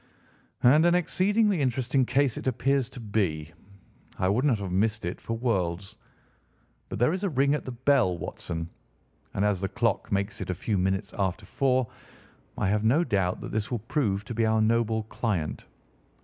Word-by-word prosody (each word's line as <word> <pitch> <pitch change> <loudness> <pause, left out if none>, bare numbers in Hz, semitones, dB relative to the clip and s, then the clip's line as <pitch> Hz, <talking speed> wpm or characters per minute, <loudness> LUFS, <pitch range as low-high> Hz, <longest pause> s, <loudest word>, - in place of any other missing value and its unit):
"And 145 +6 +6
an 175 - +4
exceedingly 195 +2 +2
interesting 130 0 +1
case 135 -2 +2
it - - -5
appears 130 +1 +1
to 130 - -10
be. 90 -8 -2 0.6
I 95 - +1
would 110 +6 +1
not 130 -6 +3
have 100 -3 -5
missed 110 +2 0
it 85 - -4
for 115 - -3
worlds. 100 -4 -1 0.9
But - - -4
there 125 +8 +3
is 190 +2 -3
a 200 - +1
ring 140 -1 +2
at 150 - -2
the 130 - -4
bell, 125 -7 +2
Watson, 80 0 -5 0.7
and 100 - +1
as 100 -3 +1
the 95 - -1
clock 115 -2 -1
makes 100 +1 -1
it 95 - -5
a 90 - -1
few 100 +2 -1
minutes 95 +2 -1
after 95 +1 -1
four, 130 +3 +1 0.7
I - - 0
have 105 +1 +1
no 135 +10 +4
doubt 95 - 0
that - - -6
this 110 0 -2
will 120 - -1
prove 105 -4 -1
to 120 - -5
be 115 0 0
our 110 0 +3
noble 110 0 +2
client. 105 -7 -3
110 Hz, 185 wpm, -27 LUFS, 95-130 Hz, 0.9 s, And